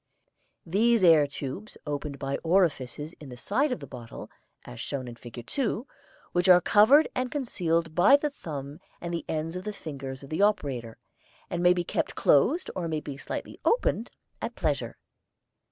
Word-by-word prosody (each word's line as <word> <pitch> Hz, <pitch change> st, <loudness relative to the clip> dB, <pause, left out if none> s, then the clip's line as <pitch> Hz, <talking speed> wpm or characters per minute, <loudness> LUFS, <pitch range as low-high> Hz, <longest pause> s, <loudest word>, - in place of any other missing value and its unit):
These 215 Hz, +5 st, +3 dB
air 160 Hz, -4 st, +7 dB
tubes 140 Hz, +9 st, -7 dB
open 145 Hz, 0 st, -3 dB
by 140 Hz, 0 st, -3 dB
orifices 160 Hz, -4 st, 0 dB
in 145 Hz, -, -10 dB
the 125 Hz, -, -9 dB
side 270 Hz, -, 0 dB
of 250 Hz, -, -2 dB
the -, -, -8 dB
bottle, 120 Hz, -3 st, -10 dB, 0.3 s
as -, -, -10 dB
shown 130 Hz, -3 st, -4 dB
in 120 Hz, -, -7 dB
Fig. 120 Hz, 0 st, -10 dB
2, 245 Hz, -, -2 dB, 0.5 s
which 180 Hz, +1 st, +2 dB
are 180 Hz, -1 st, +9 dB
covered 220 Hz, -, +6 dB
and 255 Hz, 0 st, -1 dB
concealed 170 Hz, -, -1 dB
by 180 Hz, -, +7 dB
the 295 Hz, +1 st, 0 dB
thumb 145 Hz, -, -7 dB, 0.2 s
and 170 Hz, 0 st, -5 dB
the 170 Hz, -, -3 dB
ends 160 Hz, +2 st, -2 dB
of 180 Hz, -, -5 dB
the 210 Hz, -, -3 dB
fingers 140 Hz, -7 st, -7 dB
of 140 Hz, -, -12 dB
the 160 Hz, -, 0 dB
operator, 140 Hz, -, 0 dB, 0.5 s
and 175 Hz, -, -1 dB
may 180 Hz, 0 st, +6 dB
be 175 Hz, -1 st, -1 dB
kept -, -, -2 dB
closed 280 Hz, -, +3 dB
or 180 Hz, -3 st, -2 dB
may 155 Hz, -1 st, -1 dB
be 145 Hz, -2 st, -7 dB
slightly 140 Hz, -, -6 dB
opened 250 Hz, -, +1 dB, 0.3 s
at -, -, -4 dB
pleasure. -, -, -1 dB
165 Hz, 175 wpm, -27 LUFS, 140-205 Hz, 0.5 s, are